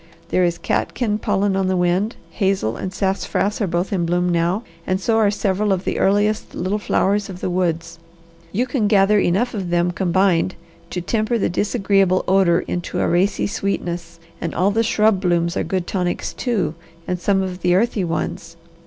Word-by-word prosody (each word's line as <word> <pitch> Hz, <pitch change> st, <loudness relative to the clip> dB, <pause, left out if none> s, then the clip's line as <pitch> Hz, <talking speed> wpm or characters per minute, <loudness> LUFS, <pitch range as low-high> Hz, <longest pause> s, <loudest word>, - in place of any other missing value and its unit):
There 185 Hz, -, +2 dB
is 170 Hz, -1 st, +1 dB
catkin 215 Hz, +3 st, -1 dB
pollen 200 Hz, -1 st, +1 dB
on 190 Hz, -1 st, +1 dB
the 185 Hz, 0 st, +1 dB
wind, 180 Hz, +6 st, +1 dB, 0.2 s
hazel 190 Hz, -, 0 dB
and 185 Hz, -, -4 dB
sassafras 195 Hz, +2 st, -1 dB
are 205 Hz, -, +1 dB
both 175 Hz, +3 st, -1 dB
in 180 Hz, -3 st, +1 dB
bloom 175 Hz, +1 st, +1 dB
now, 175 Hz, +5 st, +1 dB, 0.2 s
and 185 Hz, 0 st, +1 dB
so 225 Hz, +3 st, +1 dB
are 215 Hz, -2 st, +4 dB
several 205 Hz, 0 st, 0 dB
of 190 Hz, -1 st, 0 dB
the -, -, -2 dB
earliest 205 Hz, +2 st, +1 dB
little 190 Hz, +4 st, -1 dB
flowers 205 Hz, 0 st, +1 dB
of 185 Hz, -2 st, -7 dB
the 185 Hz, -, -2 dB
woods. 170 Hz, -2 st, -1 dB, 0.5 s
You 235 Hz, +6 st, 0 dB
can 250 Hz, -4 st, 0 dB
gather 205 Hz, 0 st, +4 dB
enough 200 Hz, +7 st, +1 dB
of 195 Hz, -5 st, -3 dB
them 175 Hz, 0 st, +2 dB
combined 185 Hz, 0 st, +1 dB, 0.3 s
to 180 Hz, -, -3 dB
temper 220 Hz, +5 st, 0 dB
the 215 Hz, -, 0 dB
disagreeable 195 Hz, -1 st, +1 dB
odour 185 Hz, -3 st, +4 dB
into 175 Hz, -1 st, -4 dB
a -, -, +1 dB
racy 185 Hz, +4 st, +1 dB
sweetness, 175 Hz, -4 st, -3 dB, 0.2 s
and 165 Hz, -, -3 dB
all 190 Hz, +3 st, +2 dB
the 225 Hz, +3 st, +2 dB
shrub 215 Hz, -3 st, +2 dB
blooms 170 Hz, -2 st, +1 dB
are -, -, 0 dB
good 185 Hz, -2 st, -2 dB
tonics, 180 Hz, -2 st, -2 dB
too, 225 Hz, -10 st, -1 dB, 0.3 s
and 180 Hz, -1 st, -2 dB
some 195 Hz, +2 st, +1 dB
of 185 Hz, -1 st, -5 dB
the 180 Hz, 0 st, +3 dB
earthy 215 Hz, 0 st, +1 dB
ones. 165 Hz, 0 st, -4 dB
190 Hz, 185 wpm, -20 LUFS, 175-205 Hz, 0.5 s, are